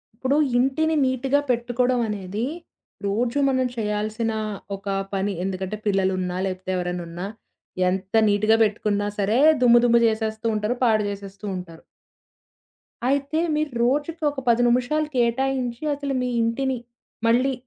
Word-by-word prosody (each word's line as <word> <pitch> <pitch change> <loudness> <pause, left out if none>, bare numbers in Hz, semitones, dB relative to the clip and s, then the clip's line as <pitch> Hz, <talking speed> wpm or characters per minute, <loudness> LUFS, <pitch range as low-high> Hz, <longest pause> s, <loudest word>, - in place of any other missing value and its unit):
ఇప్పుడు 260 +4 0 0.2
ఇంటిని 315 +6 +2
నీట్‌గా 260 +2 +1
పెట్టుకోవడం 245 +1 +1
అనేది, 205 +2 -3 0.6
రోజు 235 +7 0
మనం 260 -1 +1
చేయాల్సిన 215 +1 -1 0.4
ఒక 195 +1 -12 0.3
పని. 195 +1 0
ఎందుకంటే 190 +2 -3
పిల్లలున్నా, 185 -2 0
లేకపోతే 185 0 -4
ఎవరైనా 180 0 -3
ఉన్నా, 175 +2 -5 0.6
ఎంత 190 +2 -3
నీట్‌గా 215 +2 +3
పెట్టుకున్నా 205 -1 0
సరే, 210 +5 +2 0.2
దుమ్ము 240 -1 +7
దుమ్ము 235 0 +4
చేసేస్తూ 220 0 -2
ఉంటారు. 210 +3 -1
పాడు 220 -3 +3
జేసేస్తూ 200 0 -8
ఉంటారు. 170 -3 -9 1.2
అయితే 280 +3 0 0.2
మీరు 305 -1 -1
రోజుకి 295 +6 0
ఒక 285 - -6
10 235 +1 +4
నిమిషాలు 255 +6 +1
కేటాయించి 245 0 0
అసలు 280 -1 -3
మీ 250 - -1
ఇంటిని 255 +3 0 0.5
మళ్ళీ 250 +4 +3
230 Hz, 125 wpm, -23 LUFS, 200-260 Hz, 1.2 s, దుమ్ము